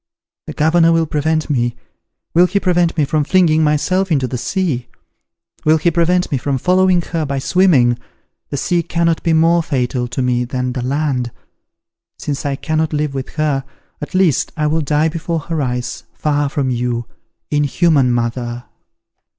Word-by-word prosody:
The - - -5
governor 165 +2 +3
will 165 0 +2
prevent 155 +1 -1
me! 120 -4 0 0.6
Will 175 +2 +5
he 200 - 0
prevent 175 -3 +1
me 150 - +3
from 150 +1 0
flinging 160 -1 +3
myself 185 +5 +1
into 140 -4 +2
the 125 - -5
sea? 130 -3 -2 0.8
will 155 +1 +4
he 170 +2 +1
prevent 175 +2 +1
me 135 - 0
from 140 +1 -1
following 180 +3 +3
her 165 -2 -3
by 140 -2 -2
swimming? 135 -6 +3 0.5
The 140 - -3
sea 175 +5 +1
cannot 170 -1 0
be 165 - +1
more 165 +2 +4
fatal 125 -5 -1
to 125 +2 -3
me 125 -1 +1
than 125 0 -3
the 125 - -3
land. 130 -1 -1 0.9
Since 145 0 -4
I 140 - -1
cannot 155 +2 -1
live 150 -1 -1
with 135 -1 -4
her, 150 -3 0 0.4
at 150 - -6
least 185 -6 +2
I 150 - 0
will 155 +2 +1
die 150 +2 +1
before 165 0 -3
her 160 0 -3
eyes, 125 -2 -3
far 145 -1 0
from 135 -2 -1
you. 120 -1 -2 0.5
Inhuman 145 -2 +2
mother! 120 0 -2
150 Hz, 165 wpm, -17 LUFS, 130-165 Hz, 0.9 s, Will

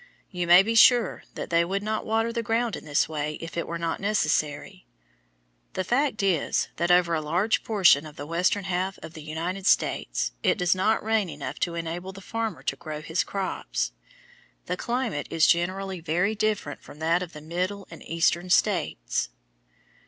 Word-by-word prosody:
You 180 -2 -2
may 175 +2 +8
be 225 +3 -1
sure 235 +1 +5
that - - -6
they 170 0 +4
would 195 +3 -2
not 215 0 -2
water 225 +1 +1
the 235 - -1
ground 230 +1 0
in - - -9
this 145 -2 +2
way 150 -1 -3
if 165 +1 -8
it 170 - -2
were 170 - -3
not 165 -1 -2
necessary. 155 - -1 0.9
The 185 - -1
fact 245 +1 0
is 180 -6 +1
that 170 - 0
over 175 -1 +4
a 160 - +1
large 175 +9 +1
portion 180 -9 +4
of 150 - -12
the 145 - -7
western 180 +5 +1
half 190 +1 -2
of 160 - -9
the 160 - -9
United 170 +6 -4
States - - +1
it - - +2
does 180 -3 +3
not 200 +4 +1
rain 220 -3 +1
enough - - -6
to 170 -1 -1
enable 170 +3 -4
the 195 - -10
farmer 215 -7 -4
to 140 - -1
grow 155 0 -7
his 160 +3 0
crops. 120 - -3 0.7
The - - -2
climate 235 - -2
is 165 -1 +3
generally 185 +2 +1
very 175 +6 0
different 215 -9 -1
from - - -13
that 165 +3 +1
of 180 -2 -6
the 150 - -8
Middle 180 +6 -3
and 165 - -10
Eastern 170 +2 0
States. - - +1
180 Hz, 185 wpm, -26 LUFS, 165-205 Hz, 0.9 s, may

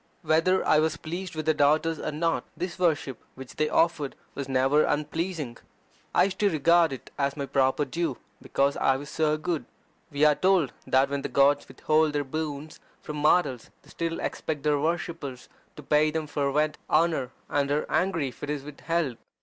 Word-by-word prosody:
Whether 165 +4 +2
I 155 - +5
was 160 +1 +1
pleased 175 +2 -6
with 155 -1 -3
their 155 - +3
daughters 155 +2 +2
or - - -3
not, 165 +2 0
this 180 0 -4
worship 150 -8 0
which 130 -1 -11
they 155 0 +1
offered 160 -4 +1 0.2
was 140 -1 -5
never 135 +3 +3
unpleasing. 150 -3 -2 0.6
I - - +6
used 190 0 -2
to 205 - +4
regard 170 0 +4
it 135 - -8
as 140 +1 0
my 140 - -2
proper 135 +2 +1
due, 165 +5 -2 0.2
because 140 +1 +1
I 135 0 +2
was 145 +2 -9
so 155 -1 +1
good. 155 -5 -2 0.4
We 145 +1 +2
are 150 - +6
told 185 -3 +2
that 135 +1 +3
when 140 0 -1
the 140 - -4
gods 140 +2 +3
withhold 155 +3 +1
their 145 -1 0
boons 150 +1 -5 0.2
from 150 - -6
mortals 150 -5 +2
they - - -17
still 165 0 -3
expect 150 -3 -3
their 150 -1 +2
worshippers 160 -5 -3 0.3
to 150 - -10
pay 150 +2 +3
them 160 0 -2
fervent 150 +1 0
honour, 155 -5 +2 0.2
and 140 -1 0
are 145 +1 0
angry 165 -7 0
if 125 - -16
it 145 - -5
is 145 -2 -3
withheld. 150 -2 -2
150 Hz, 185 wpm, -27 LUFS, 140-165 Hz, 0.6 s, I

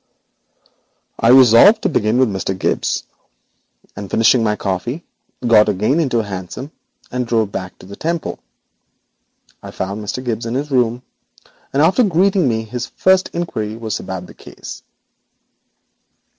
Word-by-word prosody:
I - - +2
resolved 130 - +7
to - - +2
begin 110 -6 +1
with 130 0 +4
Mr. 95 -2 -3
Gibbes, - - -1 0.9
and, 100 -1 -7
finishing 115 +3 +3
my 105 -1 +1
coffee, 105 - -3 0.4
I - - -3
got 110 -2 +5
again 105 - +1
into 135 -7 +1
a 115 - +1
hansom, 100 - -7 0.4
and 125 -1 -2
drove 110 -3 0
back 95 -1 -6
to - - -15
the 100 +2 -10
Temple. 165 +5 -3 1.2
I - - -9
found 100 +3 -4
Bentham 105 +5 -5
Gibbes 115 -1 -3
in 115 - -3
his 145 +2 -3
room, 125 -1 +1 0.7
and 140 +2 +2
after 180 +10 +4
greeting 190 - +2
me, 110 -1 -1
his 120 +3 -5
first 190 0 +2
inquiry 110 -11 -3
was 110 -2 -4
about 95 -1 -6
the 80 - -14
case. - - -11
115 Hz, 150 wpm, -18 LUFS, 105-135 Hz, 1.2 s, resolved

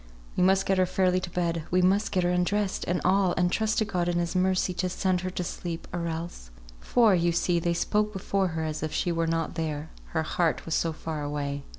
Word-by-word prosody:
"We - - 0
must 190 +1 +4
get 195 -1 +2
her 185 - +3
fairly 185 0 +2
to 180 - -6
bed; 170 -2 -1
we 180 +1 +2
must 195 +4 +2
get 185 -2 +1
her 175 - +2
undressed, 190 +3 0
and 175 +1 0
all; 190 -1 +3
and 180 0 +2
trust 220 +1 0
to 220 - +2
God, 180 -4 -1
in 175 - 0
His 175 +1 -1
mercy, 185 0 +2
to 185 0 -1
send 185 0 0
her 185 - -3
to 180 0 -3
sleep, 170 -1 -5
or 170 -1 -2
else, 165 - -5 0.2
" - - -19
For, 230 -4 +5
you 170 -1 +2
see, 170 +1 +1
they 170 0 0
spoke 210 +4 +1
before 195 -1 0
her 160 - -1
as 155 -1 -3
if 155 - -2
she 175 - 0
were 165 0 0
not 165 -1 -1
there; 160 -2 -3
her 160 -1 -2
heart 160 -4 0
was 165 - -3
so 165 - +1
far 155 -1 -5
away. 145 -1 -3
175 Hz, 245 wpm, -27 LUFS, 165-185 Hz, 0.2 s, For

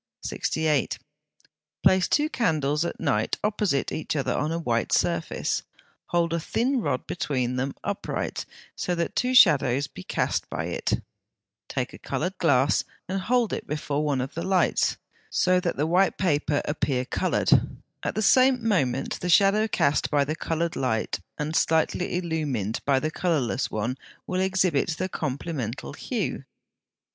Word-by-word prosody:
68. 155 -6 0 0.9
Place 185 -1 +5
two 300 +1 +2
candles 155 - +1
at 170 - -4
night 135 -10 0
opposite 205 -9 0
each 155 - -3
other 140 - 0
on 150 +2 -1
a 165 - -1
white 120 -8 -1
surface; - - 0 0.5
hold 170 -1 +1
a 170 - +1
thin 245 - 0
rod 130 - -1
between 130 -8 -1
them 130 +2 -2
upright, 200 0 -3 0.3
so 180 - -1
that 170 0 -2
two 250 +1 +1
shadows 140 - +6
be 115 - -11
cast - - -1
by - - -3
it; - - -2 0.7
take - - -3
a - - -10
coloured 180 +5 -3
glass 140 -3 +3 0.2
and 190 +1 -2
hold 240 +2 +1
it - - -4
before 150 0 -2
one 140 -4 0
of 130 - -5
the 165 - -4
lights, 185 +1 +2 0.3
so 185 0 +3
that 175 -1 -2
the 145 - +1
white 180 +4 +2
paper 150 -5 +1
appear 135 -4 -1
coloured; - - 0 0.5
at - - -3
the 215 - 0
same 255 0 +4
moment 135 - 0
the 180 - -3
shadow 200 +5 +5
cast 145 -8 +1
by 145 -2 +2
the 155 +2 -2
coloured 165 +1 -2
light 110 -7 -1 0.2
and 150 +2 -3
slightly 160 +3 +1
illumined 150 - -2
by 140 -2 +3
the 155 +3 -2
colourless 150 -8 0
one 115 +4 -2 0.3
will 185 0 -1
exhibit 185 -5 +1
the 185 - -1
complemental 135 - -4
hue. - - -3
160 Hz, 155 wpm, -26 LUFS, 140-185 Hz, 0.9 s, shadows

